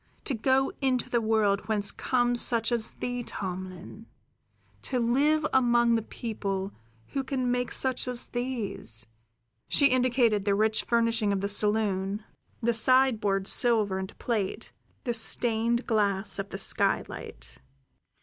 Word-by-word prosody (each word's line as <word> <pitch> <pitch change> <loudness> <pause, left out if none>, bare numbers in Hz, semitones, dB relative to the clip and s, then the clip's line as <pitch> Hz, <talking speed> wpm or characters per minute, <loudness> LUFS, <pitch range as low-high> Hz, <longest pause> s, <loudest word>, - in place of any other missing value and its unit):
To 280 - -1
go 260 +3 +1
into 260 -2 0
the 235 - +2
world 215 -3 +1
whence 210 -2 +1
comes 245 -1 +1
such 230 -1 +2
as 235 -2 -2
thee, 245 0 -3
Tomlin; 185 +1 -7 0.7
to 255 - -2
live 285 +6 +2
among 240 -2 +3
the 225 - +2
people 200 -4 -4 0.4
who 275 - -2
can 255 -2 -2
make 245 0 -1
such 260 -1 0
as 250 -1 -4
these" 240 - -3 0.6
she 280 -2 +4
indicated 245 -5 +2
the 200 0 +1
rich 215 +1 +1
furnishing 230 -2 +1
of 195 -1 -1
the 200 - -1
saloon, 205 -1 0 0.4
the 235 0 +1
sideboard 225 -5 +3
silver 215 -4 +2
and 190 0 -7
plate, 215 -6 -3 0.3
the 245 -4 -1
stained 230 +1 +2
glass 205 -2 +1
of 195 0 -4
the 195 - -6
skylight. - - 0
230 Hz, 135 wpm, -27 LUFS, 205-245 Hz, 0.7 s, she